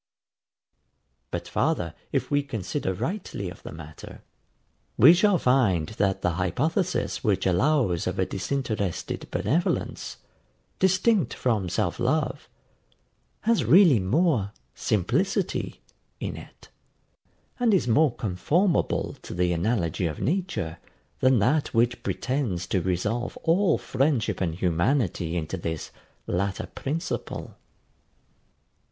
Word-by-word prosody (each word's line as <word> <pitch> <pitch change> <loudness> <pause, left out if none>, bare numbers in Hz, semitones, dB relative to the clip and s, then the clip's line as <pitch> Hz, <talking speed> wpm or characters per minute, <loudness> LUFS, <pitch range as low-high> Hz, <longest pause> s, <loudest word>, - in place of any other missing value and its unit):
But - - -4
farther, 85 -2 0 0.2
if - - -1
we 145 0 +3
consider 115 -3 -3
rightly 110 - -4
of 90 - -13
the - - -8
matter, 80 -1 -11 0.7
we 150 +9 +9
shall 190 +1 +4
find 115 - +2
that 100 -3 -1
the 90 - +2
hypothesis 155 - 0
which 100 -5 +1
allows 95 - +2
of 95 +1 -2
a 95 - +2
disinterested 105 -3 -3
benevolence, 170 +5 -1 0.6
distinct 190 - +2
from 110 -7 0
self 90 -1 -1
love, 135 +2 0 0.9
has 225 - +2
really 155 - +6
more 115 - +1 0.2
SIMPLICITY 145 - -1 0.4
in - - -4
it, - - -13 0.9
and 240 -2 +3
is 190 -10 +2
more 135 +2 +3
conformable 150 - +1
to - - -8
the 90 0 +1
analogy 85 -2 0
of 75 - -5
nature 155 - -2 0.4
than 130 -1 +4
that 130 +6 +1
which 120 +1 +2
pretends 125 -10 -2
to 95 - 0
resolve 105 +7 -1
all 180 +4 +3
friendship 130 -8 0
and 85 -3 0
humanity 90 - 0
into 80 +3 -3
this 80 -3 -4 0.3
latter 95 +2 -1
principle. 160 +6 -4
115 Hz, 110 wpm, -26 LUFS, 90-155 Hz, 0.9 s, we